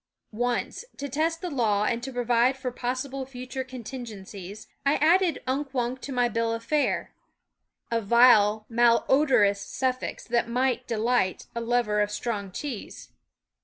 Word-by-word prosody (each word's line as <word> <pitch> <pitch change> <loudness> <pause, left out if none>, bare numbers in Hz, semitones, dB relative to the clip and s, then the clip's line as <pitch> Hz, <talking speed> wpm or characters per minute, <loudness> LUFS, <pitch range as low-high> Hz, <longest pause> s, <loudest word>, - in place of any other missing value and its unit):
Once, 245 - -2
to 285 - -4
test 320 +4 -1
the 360 - -3
law 215 -6 +1
and 235 +1 0
to 265 +2 -5
provide 245 +1 +2
for 255 -1 -4
possible 255 +2 -3
future 260 0 -6
contingencies, 220 -6 -8 0.2
I 280 +2 +3
added 340 0 +3
Unk 270 +1 -2
Wunk 250 +1 -1
to 280 - -6
my 245 -2 +2
bill 230 0 -1
of 230 0 -5
fare 295 +4 0 0.8
a 230 0 +1
vile, 215 -1 +5
malodorous 235 -2 +3
^ - - -9
SCHOOL 260 0 0
OF - - -1
suffix 255 - -7
that 235 0 0
might 250 +1 0
delight 230 -4 0
a 235 - -3
lover 230 -3 +1
of 205 - +1
strong 210 -2 -3
cheese. 255 +2 -7
245 Hz, 160 wpm, -26 LUFS, 225-265 Hz, 0.8 s, vile